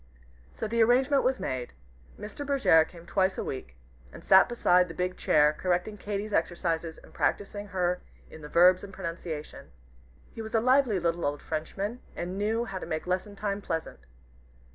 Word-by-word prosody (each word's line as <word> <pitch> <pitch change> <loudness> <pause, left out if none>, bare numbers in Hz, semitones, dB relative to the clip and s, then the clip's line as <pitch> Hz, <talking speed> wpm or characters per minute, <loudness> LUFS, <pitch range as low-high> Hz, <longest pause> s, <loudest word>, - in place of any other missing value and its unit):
So - - -4
the 230 +1 +1
arrangement 260 +4 +4
was 260 0 +1
made. 125 -1 -4 0.5
Mr. 215 +7 -7
Bergèr 270 - +4
came 170 -1 -14
twice 190 0 +1
every - - -3
week, 65 - -11 0.4
and - - -12
sat 190 +4 +7
beside 180 -6 +3
the 165 - -9
big 180 0 -2
chair, 150 0 +3
correcting 180 +5 -1
Katy's 205 +1 -4
exercises 165 -1 -1
and - - -17
practising 205 +7 -1
her 180 -2 -1 0.3
in 160 - -12
the 150 - -9
verbs 180 +3 +5
and 200 - -8
pronunciation. 165 -4 -6 0.6
He 225 - -7
was 220 +1 -5
a - - +5
lively 255 -3 +3
little 170 0 -1
old 145 0 -2
Frenchman, 195 +9 -4 0.2
and 180 +2 -4
knew 220 +4 0
how 195 -5 -5
to - - -7
make 155 0 -3
lesson 185 +3 -2
time 200 0 -3
pleasant. 165 -4 -4
185 Hz, 175 wpm, -28 LUFS, 165-215 Hz, 0.6 s, sat